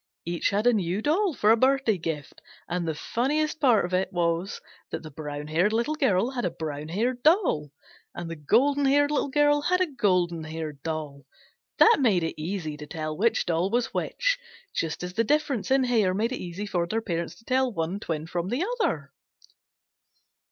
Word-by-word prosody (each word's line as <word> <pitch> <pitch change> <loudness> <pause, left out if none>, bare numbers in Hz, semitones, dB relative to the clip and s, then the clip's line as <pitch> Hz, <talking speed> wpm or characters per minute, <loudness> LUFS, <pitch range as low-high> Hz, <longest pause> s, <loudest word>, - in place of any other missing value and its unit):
Each 170 0 0
had 205 +2 0
a 245 - +5
new 185 -2 0
doll 345 +2 +1
for 210 -1 +4
a - - +7
birthday 260 -4 +2
gift, 155 -3 -5 0.3
and 175 -1 -2
the 160 - -1
funniest 295 - -1
part 235 - +4
of 180 - -6
it 185 +1 +1
was 170 +1 -1 0.3
that - - -5
the 155 - -9
brown 145 0 -6
haired 170 +8 +1
Little 235 +7 +1
Girl 245 - +1
had 250 -2 -3
a 180 - +1
brown 155 -3 -5
haired 240 +9 -1
doll 310 - +3 0.5
and 175 - -5
the 165 - -5
golden 275 - +2
haired 290 +2 +3
Little 290 - 0
Girl 290 +1 +3
had 365 +5 +2
a 370 - +3
golden 180 - 0
haired 155 -3 -6
doll. 150 -4 -5 0.5
That 460 - +7
made 210 -10 +3
it 160 -1 -4
easy 160 -3 -3
to 150 0 -9
tell 155 0 -4
which 225 +7 +1
doll 170 +2 +1
was 240 +2 0
which, - - 0 0.3
just 165 +1 -2
as 180 0 -5
the 230 - +2
difference 280 -5 0
in 265 0 +4
hair 220 -7 +2
made 225 +5 0
it 255 - -3
easy 180 +3 -5
for 175 -4 -1
their 220 +5 0
parents 170 -6 -3
to 225 - -21
tell 260 0 +1
one 170 0 -2
twin 160 -5 -3
from 175 +1 -3
the 270 - 0 0.2
other. 140 - -1
195 Hz, 195 wpm, -26 LUFS, 165-260 Hz, 0.5 s, a